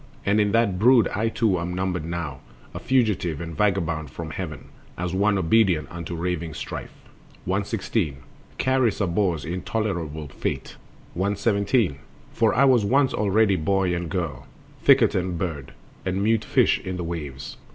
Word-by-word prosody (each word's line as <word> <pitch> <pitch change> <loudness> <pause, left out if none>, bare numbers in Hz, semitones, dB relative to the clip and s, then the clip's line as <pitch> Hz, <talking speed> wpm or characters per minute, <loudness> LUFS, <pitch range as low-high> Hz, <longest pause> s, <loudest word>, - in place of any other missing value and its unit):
And 105 +2 +3
in 105 -1 +1
that 115 -6 +2
brood 120 -1 +6
I 110 +3 0
too 110 -6 +1
am 90 +1 -3
numbered 90 -3 -2
now, 85 -5 -4 0.3
A - - -5
fugitive 105 - +1
and 85 -1 -6
vagabond 85 -6 0
from 80 +3 -7
heaven, 80 -3 -6 0.3
As 90 0 -3
one 100 +2 +2
obedient 90 -4 +3
unto 85 0 -6
raving 85 -2 -3
Strife. - - -6 0.6
116. 95 - -1 0.4
Charis 130 -5 +1
abhors 90 -4 0
intolerable 85 -4 -3
Fate. - - -4 0.4
117. 100 - +1 0.3
For 115 -1 +3
I 135 +4 +5
was 125 -5 +5
once 135 +6 +3
already 105 0 +3
boy 95 +2 +1
and 85 -1 -3
girl, 85 -9 -3 0.3
Thicket - - +5
and 90 -1 -1
bird, 80 -6 -4 0.3
and 95 +1 -1
mute 110 0 +2
fish - - +3
in 95 -1 -5
the 90 - -3
waves. 75 -5 -6
95 Hz, 150 wpm, -24 LUFS, 85-105 Hz, 0.6 s, brood